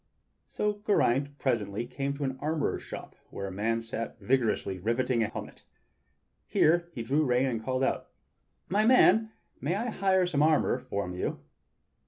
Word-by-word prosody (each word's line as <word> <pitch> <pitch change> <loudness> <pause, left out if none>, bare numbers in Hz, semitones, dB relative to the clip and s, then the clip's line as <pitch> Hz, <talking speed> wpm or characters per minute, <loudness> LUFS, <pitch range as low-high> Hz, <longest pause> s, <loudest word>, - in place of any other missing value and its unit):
So 210 0 -2
Geraint 140 - +2
presently 115 -5 -1
came 140 +3 -3
to 145 - -3
an 130 -1 -1
armorer's 155 0 -1
shop - - -9
where 100 - -5
a 95 - -5
man 115 +4 -1
sat 115 0 -5
vigorously 110 -4 0
riveting 120 +4 +1
a 110 - +2
helmet. - - -8 0.9
Here 170 +2 +3
he 120 -8 -5
drew 140 +6 +2
rein 125 -1 +2
and 115 -4 -2
called 130 +2 -1
out: - - 0 0.6
"My 205 +3 +2
man, 225 -2 +5 0.3
can - - -2
I 235 +4 -2
hire 190 -2 +2
some 150 -5 0
armor 155 -4 +3
from 100 -7 -4
you.?" 90 - -2
130 Hz, 160 wpm, -29 LUFS, 115-160 Hz, 0.9 s, man